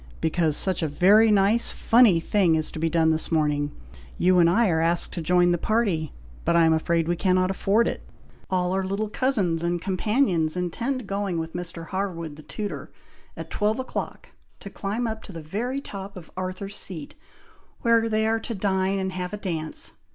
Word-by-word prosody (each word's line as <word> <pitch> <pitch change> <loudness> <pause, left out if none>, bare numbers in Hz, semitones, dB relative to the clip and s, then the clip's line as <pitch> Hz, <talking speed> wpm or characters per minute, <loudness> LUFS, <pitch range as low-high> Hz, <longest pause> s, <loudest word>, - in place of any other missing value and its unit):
"Because 160 -2 +1
such 185 -2 -1
a 160 - +1
very 200 +9 +5
nice, 210 +3 +3
funny 225 -7 +4
thing 175 -1 +2
is 155 -1 -2
to - - -7
be 165 +1 +1
done 160 0 +3
this 160 +2 -2
morning. 150 -2 +1 0.5
You 180 0 +4
and 170 -1 +6
I 225 +6 +3
are 160 -1 +1
asked 170 +1 +1
to 170 - -4
join 175 +2 +3
the 175 - +1
party, 195 -9 0 0.3
but - - +1
I 170 -1 +5
am 160 - +4
afraid 165 +1 +1
we 175 - +1
cannot 185 +1 +2
afford 205 +4 +2
it! - - -3 0.5
All 180 -1 0
our 190 0 0
little 200 +3 -2
cousins 205 -10 0
and 175 0 0
companions 185 - +1
intend 235 +8 -2
going 195 -2 -2
with 160 0 -4
Mr. 170 -1 -4
Harwood, 175 -5 -3
the 155 - -12
tutor, 205 +6 -6 0.5
at - - -8
twelve 210 +1 0
o'clock, 260 - -5 0.3
to 200 - -9
climb 210 +6 -3
up 220 -1 -3
to - - -10
the 165 -3 -8
very 235 - -3
top 195 -4 -8
of 170 -3 -11
Arthur's 185 +2 -5
Seat, 160 -6 -6 0.7
where 230 -1 +3
they 220 0 +1
are 225 +1 +1
to 230 0 -5
dine 190 0 0
and 190 -1 -2
have 180 +1 -5
a - - -2
dance. 165 -6 -2
185 Hz, 195 wpm, -25 LUFS, 165-210 Hz, 0.7 s, and